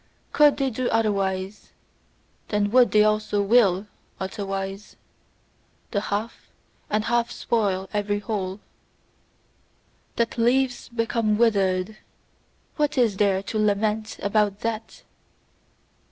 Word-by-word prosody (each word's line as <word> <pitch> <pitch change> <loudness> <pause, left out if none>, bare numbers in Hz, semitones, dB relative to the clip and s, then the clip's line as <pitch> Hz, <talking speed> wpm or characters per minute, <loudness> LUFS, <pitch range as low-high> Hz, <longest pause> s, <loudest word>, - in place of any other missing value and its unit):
COULD 295 -1 +5
they 275 -2 0
do 245 +2 -2
otherwise, 195 -3 -1 0.7
then 205 -1 0
would 250 0 +5
they 210 0 +5
also 215 -1 +1
WILL 200 -3 +3 0.3
otherwise. 195 0 -5 1.0
The 200 - 0
half 210 +3 -4 0.4
and 215 0 0
half 235 0 +1
spoil 195 -5 -1
every 205 0 0
whole. 200 -2 -4 1.6
That 235 0 -1
leaves 250 +2 +1
become 230 -2 0
withered, 200 -3 +1 0.8
what 295 -2 0
is 225 -6 +2
there 195 -2 +2
to 215 +2 -3
lament 215 +1 0
about 205 0 +1
that! 225 -1 -4
215 Hz, 105 wpm, -24 LUFS, 200-230 Hz, 1.6 s, COULD